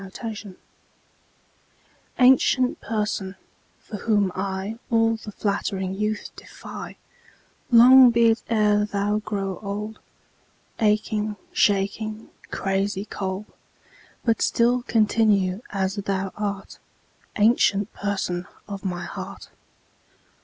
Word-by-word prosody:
7 195 - -9
Autoplay 210 -2 -7 1.6
Ancient 255 0 +4
Person, 210 -3 -2 0.4
for 210 - -8
whom 205 -3 +1
I 195 +3 -4
All 225 -1 +3
the 220 -1 -9
flattering 195 -2 -2
youth 210 +1 -3
defy, - - -10 0.7
Long 250 +1 +9
be 230 -1 +4
it 225 - -1
e'er 210 -2 +3
thou 205 0 -1
grow 195 -3 -4
old, 210 +1 -5 0.8
Aching, 210 0 +1 0.2
shaking, 215 +2 0 0.2
crazy 195 +1 -1
cold; 195 0 -4 0.8
But 230 -2 +2
still 245 +1 +2
continue 210 -4 +2
as 195 0 -2
thou 195 -1 -2
art, 200 -2 -5 0.6
Ancient 205 -2 +3
Person 190 -3 -3 0.2
of 200 -1 -7
my 180 -2 -3
heart. - - -8
210 Hz, 100 wpm, -24 LUFS, 195-220 Hz, 1.6 s, Long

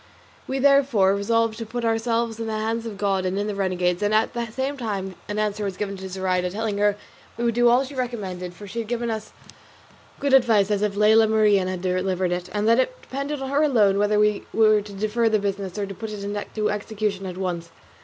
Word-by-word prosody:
We 265 - -2
therefore 265 -8 +4
resolved 230 +2 0
to 230 - -4
put 240 +1 -3
ourselves 230 0 0
in 225 - -3
the 220 -1 -2
hands 225 +1 -2
of 210 -3 -7
God 195 -2 0
and 185 +1 -1
in 205 - -1
the 210 - -2
renegade's; 185 -2 0
and 205 +1 +2
at 220 +1 +2
the 235 -1 -3
same 265 +5 -3
time 200 -7 -4 0.2
an 210 - -3
answer 210 0 -1
was 195 -2 -3
given 200 -1 -3
to 190 0 -7
Zoraida, 185 -1 -1
telling 210 +1 -3
her 205 0 +3
that - - -16 0.4
we 235 - -3
would 235 -1 +2
do 240 +1 +4
all 245 +3 +4
she 275 - -10
recommended, 195 -9 -4
for 205 - -10
she 205 +4 -5
had 225 - -4
given 235 0 -2
as 220 -1 -5 0.9
good 280 -1 0
advice 225 -6 +4
as 205 -1 +1
if 210 -1 0
Lela 220 +2 +5
Marien 210 -3 +3
had 185 -1 -4
delivered 185 0 0
it, 180 0 -3
and 210 +1 -1
that 230 +2 +5
it - - 0
depended 280 +1 -4
on 265 - -4
her 285 +1 +2
alone 215 -10 +3
whether 205 +1 +2
we 210 -1 +2
were 215 -1 +5
to 205 0 -11
defer 215 +3 0
the 215 - +3
business 200 -1 -3
or 205 - -1
put 200 +3 -7
it 205 -1 -6
in 205 +1 -3
execution 210 -1 -2
at 180 -1 -6
once. 175 -3 -3
210 Hz, 235 wpm, -24 LUFS, 195-230 Hz, 0.9 s, Lela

